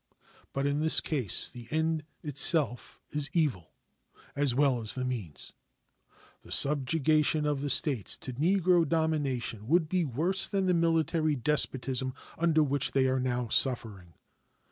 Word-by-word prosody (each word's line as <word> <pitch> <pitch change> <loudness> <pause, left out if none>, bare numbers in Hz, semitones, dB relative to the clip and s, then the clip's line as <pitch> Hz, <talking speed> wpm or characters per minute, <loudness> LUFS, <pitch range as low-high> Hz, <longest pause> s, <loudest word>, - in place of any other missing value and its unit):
But 140 0 -3
in 145 +1 -1
this 160 +1 +6
case 130 - +1
the 120 -2 -12
end 160 0 -2 0.2
itself 145 -4 +3
is 145 -1 -3
evil, 140 - -2 0.6
as 140 -4 0
well 135 -3 +1
as 110 - -1
the 130 -1 -4
means. 110 -12 -5 0.9
The - - -15
subjugation 150 +2 +1
of 145 -2 -2
the 145 - -3
States 135 - +1
to 130 - -7
Negro 175 +2 +1
domination 140 -9 -2
would 165 +2 +1
be 180 +2 -1
worse 165 +8 0
than 195 -2 -2
the 180 - +1
military 165 -2 0
despotism 130 -1 0 0.2
under 160 -2 +1
which 140 -1 -1
they 135 -1 +2
are 130 0 -1
now 125 -2 -3
suffering. 105 -10 0
145 Hz, 145 wpm, -28 LUFS, 125-160 Hz, 0.9 s, this